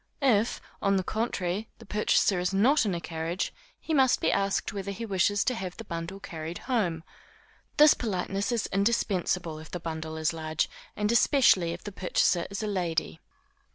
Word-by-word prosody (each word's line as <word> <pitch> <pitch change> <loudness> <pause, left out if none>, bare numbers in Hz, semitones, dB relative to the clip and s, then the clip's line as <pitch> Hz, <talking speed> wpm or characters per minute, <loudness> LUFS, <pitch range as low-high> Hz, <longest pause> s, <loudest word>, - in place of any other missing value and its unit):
If, 230 -4 +3 0.2
on 195 0 +2
the 190 - +1
contrary, 210 -2 -2
the 230 - -14
purchaser 205 -2 +2
is 180 +1 0
not 235 +4 +4
in 190 - 0
a - - -2
carriage, 165 +2 -3 0.3
he 320 - -3
must 265 -4 +4
be - - +2
asked 195 +1 0
whether 200 -1 -4
he 215 +4 -4
wishes 200 0 +2
to 255 - +1
have 185 -6 -5
the 225 - -7
bundle 170 0 -5
carried 165 -2 -6
home. 185 -11 0 0.7
This 300 0 +8
politeness 200 0 -2
is 235 -3 0
indispensable 185 -5 0
if 155 - -11
the 180 - -5
bundle 160 -1 -5
is 155 +1 0
large, 160 -1 -1 0.3
and 210 +1 0
especially 235 - +4
if 170 - -7
the 205 - -6
purchaser 180 -2 +1
is 200 +2 -4
a - - -1
lady. 170 -5 -1
195 Hz, 180 wpm, -28 LUFS, 170-215 Hz, 0.7 s, This